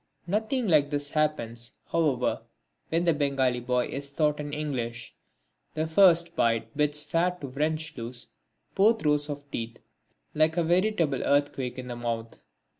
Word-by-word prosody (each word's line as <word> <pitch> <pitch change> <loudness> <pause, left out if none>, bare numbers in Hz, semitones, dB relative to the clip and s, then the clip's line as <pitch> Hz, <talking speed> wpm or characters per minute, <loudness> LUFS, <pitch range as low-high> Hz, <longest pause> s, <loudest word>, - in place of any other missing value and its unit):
Nothing 220 +6 -1
like 150 -5 +4
this 145 -1 -1
happens, 120 -7 -1 0.2
however, 145 -7 +1 0.5
when 165 +2 +1
the 170 - +4
Bengali 135 -4 +1
boy 125 0 0
is 140 +1 -5
taught 150 0 +1
in 145 0 -5
English. 125 -6 -4 0.6
The 155 0 0
first 170 0 +4
bite 115 -1 0
bids 150 0 +2
fair 180 +3 0
to 140 - -5
wrench 155 +3 -2
loose 120 0 -5 0.5
both 220 +2 +3
rows 150 0 +2
of 145 -1 -7
teeth 115 0 -4 0.6
like 155 +2 +2
a 170 - +3
veritable 175 -4 +1
earthquake 140 -3 0
in 130 -1 -6
the 120 - -5
mouth! 115 -1 -4
145 Hz, 150 wpm, -27 LUFS, 125-160 Hz, 0.6 s, like